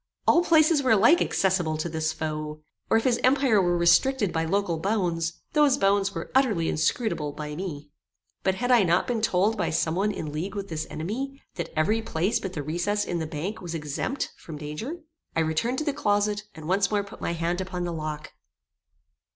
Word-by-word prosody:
All 345 - +5
places 315 -2 +4
were 260 - 0
alike 230 - +5
accessible 175 -5 +1
to 155 - -2
this 160 -1 -1
foe, 155 -1 -4 0.3
or - - +5
if 225 - 0
his 245 -2 +2
empire 255 -5 +4
were 175 -1 +2
restricted 205 +5 +3
by 165 0 0
local 180 -1 0
bounds, 170 -4 -1
those 295 -3 +4
bounds 195 -2 +2
were - - -5
utterly 220 -12 +2
inscrutable 160 - 0
by 150 0 -6
me. 150 -5 -6 0.5
But 190 - +1
had 245 +5 -1
I 245 -3 +7
not 175 -1 +2
been 240 -3 -1
told 220 0 +2
by - - +1
some 160 0 0
one 200 +4 +1
in 155 -6 -5
league 175 +7 -4
with 200 -1 -5
this 155 -1 -3
enemy, 260 - -4
that 170 - -4
every 215 +9 +2
place 190 -1 0
but 190 -2 -5
the 150 - -4
recess 175 +7 -1
in 175 - -2
the 160 - -3
bank 170 +7 -4
was 170 -2 -5
exempt 155 - -3
from 155 -3 -9
danger? 150 - -5 0.4
I 165 - +3
returned 160 +11 0
to 310 - -1
the 290 - 0
closet, 205 -5 0
and 155 -1 -9
once 195 +2 +2
more 205 -1 +1
put 200 - -12
my - - -1
hand 170 +2 -1
upon 185 -1 -4
the 175 -1 -3
lock. 155 -1 -5
185 Hz, 200 wpm, -26 LUFS, 160-220 Hz, 0.5 s, I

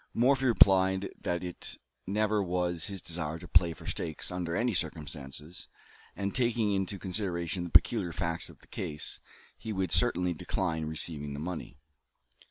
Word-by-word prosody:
Morphy 130 +3 +4
replied 95 -4 +5
that 85 +1 -1
it 90 -1 -5 0.3
never 105 +1 +2
was 90 -2 0
his 100 -2 -5
desire 80 -2 -3
to - - -10
play 85 -2 +5
for 80 - -10
stakes 80 +1 -2
under 90 -2 -2
any 120 +2 +1
circumstances; 75 -1 -4 0.5
and, 100 0 -2
taking 120 -4 +2
into 95 0 -1
consideration 90 -2 -2
the - - -5
peculiar 95 -1 +4
facts 85 -1 -1
of - - -15
the - - -19
case, 75 0 -3 0.4
he 110 +1 -5
would 95 -4 -1
certainly 90 -7 +3
decline 80 -1 -1
receiving 75 -2 -2
the 70 - -5
money. 85 -3 -5
90 Hz, 155 wpm, -30 LUFS, 80-100 Hz, 0.5 s, replied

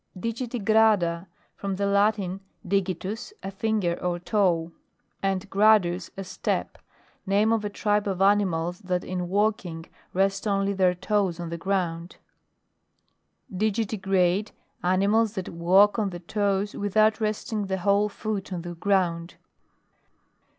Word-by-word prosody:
DIGITIGRADA. 220 -6 +1 0.3
From 195 -1 -3
the 200 +1 -1
Latin 200 -2 +1 0.3
digi 190 -2 0
tus, 220 - -6
a 195 - -4
finger 195 -4 -1
or 175 -1 -1
toe, 175 -3 +1 0.5
and 195 -1 -1
gradus, 195 -4 +3
a 195 - -4
step. 185 0 -3 0.5
Name 210 +3 +3
of 225 -2 0
a 210 - -2
tribe 205 0 0
of 190 -2 -2
animals 185 -4 +2
that 180 -3 -2
in 180 -1 -4
walking 195 -5 -1 0.3
rest 195 +2 0
only 200 0 +1
their 185 -2 +2
toes 190 -2 0
on 170 -1 -5
the 170 - -4
ground. 175 -2 -2 1.4
DIGITIGRADE. 195 -2 0 0.3
Animals 200 +4 +2
that 190 -5 -4
walk 190 +6 +4
on 205 -2 0
the 175 -2 -7
toes, 200 +2 -1
without 215 +2 +2
resting 215 -1 -2
the 190 0 -1
whole 200 +3 +2
foot 210 -1 -4
on 175 -2 -4
the 175 0 -6
ground. 175 -2 0
195 Hz, 130 wpm, -26 LUFS, 180-210 Hz, 1.4 s, walk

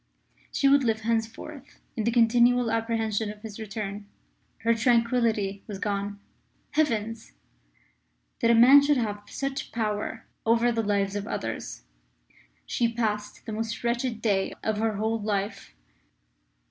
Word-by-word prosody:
She 275 - +2
would 280 0 +5
live 220 -2 +1
henceforth 230 +5 -4 0.2
in 230 +1 0
continual 240 0 +4
apprehension 225 -2 0
of 210 +1 -14
his 220 -1 -8
return. 205 -1 -5 0.6
Her 230 +1 +4
tranquillity 230 -4 +1
was 205 -3 -5
gone. 200 0 -3 0.5
Heavens! 225 -7 -1 1.1
That 230 - +2
a 235 - +6
man 260 +5 +8
should 285 0 +3
have 210 -4 -2
such 275 +5 -4
power 220 0 -3 0.2
over 230 +1 +3
the 230 -1 0
lives 200 -2 0
of 205 +1 -3
others! 115 - -5 0.8
She 235 -1 0
passed 215 -3 -3
the - - -5
most 225 +2 -4
wretched 235 -1 -1
day 195 -4 +1
of 220 -1 0
her 220 0 0
whole 220 +2 -1
life. 205 - -3
225 Hz, 135 wpm, -27 LUFS, 210-235 Hz, 1.1 s, man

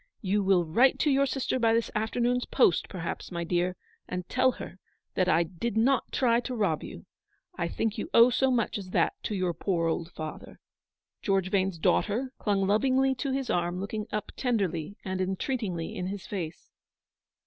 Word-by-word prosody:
You 200 +1 +1
will 190 -3 +3
write 240 +12 +4
to 300 - +3
your 275 +1 +3
sister 260 -1 -1
by 225 -1 +3
this 230 - 0
afternoon's 240 +3 0
post, 215 - +3
perhaps, 175 -1 -5
my 170 -1 -3
dear, 175 +2 0 0.3
and 180 -1 -4
tell 255 0 +3
her 185 - -9 0.3
that 185 -1 +1
I 170 - +4
did 190 +7 -4
not 255 +4 +2
try 235 -3 +3
to 250 +1 -4
rob 195 -9 +1
you. - - -9 0.5
I 170 - -1
think 220 +5 -2
you - - -4
owe 235 +2 +7
so 265 +2 +2
much 235 -4 0
as 190 -2 -8
that - - +2
to 210 - -3
your 185 -2 0
poor 170 -2 -1
old 165 +1 -2
father/' 155 -2 -7 0.6
George 195 -2 +1
Vane's 190 -3 +1
daughter 235 +10 +1
clung 200 -2 +1
lovingly 260 +6 +3
to 265 +1 -3
his 265 -1 -1
arm, 175 +1 0
looking 210 +2 -4
up 210 - -3
tenderly 200 - -1
and 185 -1 -2
entreatingly 190 -2 -2
in 180 -3 -3
his 195 0 -5
face. 175 -7 -6
200 Hz, 180 wpm, -28 LUFS, 180-245 Hz, 0.6 s, owe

